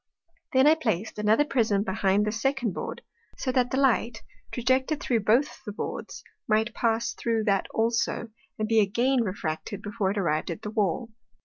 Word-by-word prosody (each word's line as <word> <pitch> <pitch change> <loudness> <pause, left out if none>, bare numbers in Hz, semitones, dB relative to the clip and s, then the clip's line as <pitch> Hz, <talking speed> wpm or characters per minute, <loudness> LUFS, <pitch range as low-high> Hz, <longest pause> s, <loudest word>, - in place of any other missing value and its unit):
Then 260 +1 +5
I 305 - +8
plac'd 220 - -2
another 215 +7 +3
Prism 220 -8 +1
behind 195 0 +1
this 215 +1 -2
second 270 -6 0
Board, - - -6 0.3
so 260 - -1
that 250 -1 +2
the 260 - -1
Light, 240 -5 +1 0.3
trajected 260 +4 +1
through 235 -3 +1
both 230 +8 +1
the 210 - -5
Boards, 205 - -6 0.2
might 220 +1 +2
pass 230 0 0
thro' 225 -2 -1
that 200 -3 +1
also, 230 0 0 0.3
and 215 - -1
be 225 0 +4
again 240 +6 +2
refracted 190 0 -4
before 205 -1 -1
it 200 - -2
arrived 155 -5 0
at 170 - -5
the 210 - -4
Wall. 215 +2 -1
225 Hz, 175 wpm, -27 LUFS, 205-245 Hz, 0.3 s, I